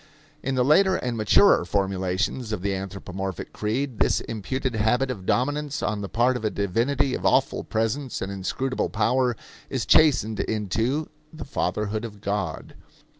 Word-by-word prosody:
In 135 0 -2
the 125 -1 +2
later 185 +6 +5
and 125 -2 -2
maturer 110 -4 +5
formulations 95 +5 -1
of 105 -4 -3
the 100 -1 0
anthropomorphic 95 -1 -5
creed 115 +2 -2
this - - +3
imputed 125 +4 -3
habit 120 +5 +1
of 95 -6 -7
dominance 145 +3 0
on 105 -1 -1
the 100 - -5
part 125 +2 +2
of 125 - -4
a 110 - +2
divinity 125 +8 0
of - - -3
awful - - +2
presence 115 +5 -2
and 95 - -4
inscrutable 130 +7 -2
power 120 +3 +1 0.3
is - - -2
chastened 125 -8 +4
into 115 +8 -1 0.2
"the 155 - -8
fatherhood 105 -4 -2
of 105 -3 -7
God." 100 -5 -3
110 Hz, 155 wpm, -25 LUFS, 100-130 Hz, 0.3 s, later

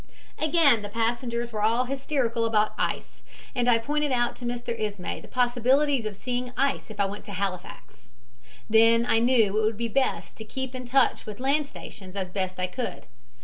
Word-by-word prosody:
"Again, 305 -7 +4
the 205 - -6
passengers 235 +2 -1
were 210 - -2
all 230 +4 +3
hysterical 265 -3 -1
about 215 -1 +2
ice, - - -3 0.3
and 245 -1 0
I 235 - +6
pointed 295 +5 -1
out 240 -1 +1
to 245 - -7
Mr. 240 0 -3
Ismay 205 -4 -4
the - - -13
possibilities 250 +1 +2
of 205 -2 -7
seeing 250 +1 -3
ice 275 -1 0
if 215 -1 -10
I 200 - +4
went 200 +1 -5
to 205 - -8
Halifax. 185 - -5 0.6
Then 230 +1 +5
I 225 - +3
knew 225 -4 +3
it - - +1
would 215 0 0
be 235 +1 -1
best 265 +4 -1
to 220 - -7
keep 265 +4 -5
in 255 -1 -6
touch 255 -1 +2
with 210 -1 -7
land 280 +3 +1
stations 190 -8 -10
as 190 -2 -3
best 185 -1 -3
I 180 - +1
could. 185 - -5
235 Hz, 190 wpm, -26 LUFS, 210-255 Hz, 0.6 s, I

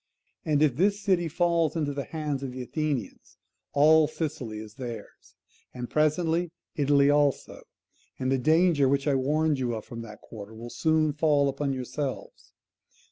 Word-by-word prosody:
And 150 -1 +2
if 140 -5 +2
this 200 +4 +2
city 185 -4 +1
falls 170 -1 +1
into 150 -3 -1
the 140 0 -4
hands 150 -4 -3
of 135 -2 -4
the 130 0 -5
Athenians, 145 - -4 0.3
all 155 +2 +5
Sicily 145 -8 -4
is 105 -1 -9
theirs, 120 -4 -9 0.4
and 125 -1 -6
presently 160 +3 +1 0.3
Italy 145 -2 +4
also: 145 -2 +1 0.6
and 130 0 -1
the 135 - +2
danger 155 -1 +3
which 140 +1 +1
I 145 - +3
warned 150 +2 +1
you 120 -2 -1
of 110 - -7
from 115 -1 -8
that 105 -2 -10
quarter 110 0 -10
will 120 +2 -8
soon 155 +4 +1
fall 145 -2 +2
upon 140 +1 -2
yourselves. 130 +2 -5
145 Hz, 160 wpm, -27 LUFS, 130-155 Hz, 0.6 s, all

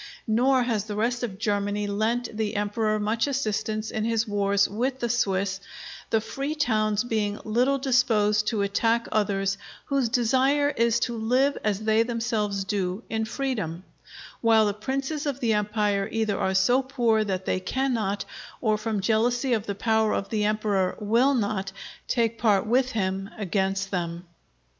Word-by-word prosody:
Nor 250 +3 +3
has 220 -4 -1
the 210 -1 -5
rest 235 +3 0
of 215 -6 -4
Germany 205 -1 -1
lent 220 +3 -1
the 215 0 -2
Emperor 215 +1 0
much 220 +5 0
assistance 220 -5 -2
in 215 - -2
his 225 0 0
wars 200 -1 +2
with 255 +5 -2
the 240 - -1
Swiss, 195 -4 0 0.5
the 225 - +3
Free 275 +7 -4
Towns 215 -7 +1
being 215 -3 -1
little 250 +5 +2
disposed 225 -6 +2
to 215 -4 +1
attack 225 +4 +1
others 195 -2 0 0.3
whose 275 -4 0
desire 265 +4 +2
is 235 -4 +2
to 240 - -1
live 255 +5 +2
as 210 -1 0
they 220 +1 +3
themselves 225 -4 -1
do, 195 +1 -2
in 220 0 0
freedom; 215 - -3 0.6
while 225 -2 +5
the 205 - 0
Princes 275 +7 -3
of 275 -2 -2
the 230 -4 +1
Empire 210 -1 0
either 220 -2 0
are 190 - 0
so 245 +8 +4
poor 240 -5 +1
that 190 -2 -3
they - - 0
cannot, 215 -1 -1 0.3
or 215 -3 +1
from 215 -2 -2
jealousy 240 +5 +1
of 220 -2 -1
the 200 - -2
power 220 +1 +1
of 195 - -3
the 210 -2 0
Emperor 210 -3 0
will 235 +7 +3
not, 205 -4 -1 0.4
take 230 -2 0
part 205 -4 +3
with 250 +3 +1
him 195 -2 -2
against 195 -1 -1
them. 170 -1 -3
220 Hz, 160 wpm, -26 LUFS, 205-240 Hz, 0.6 s, while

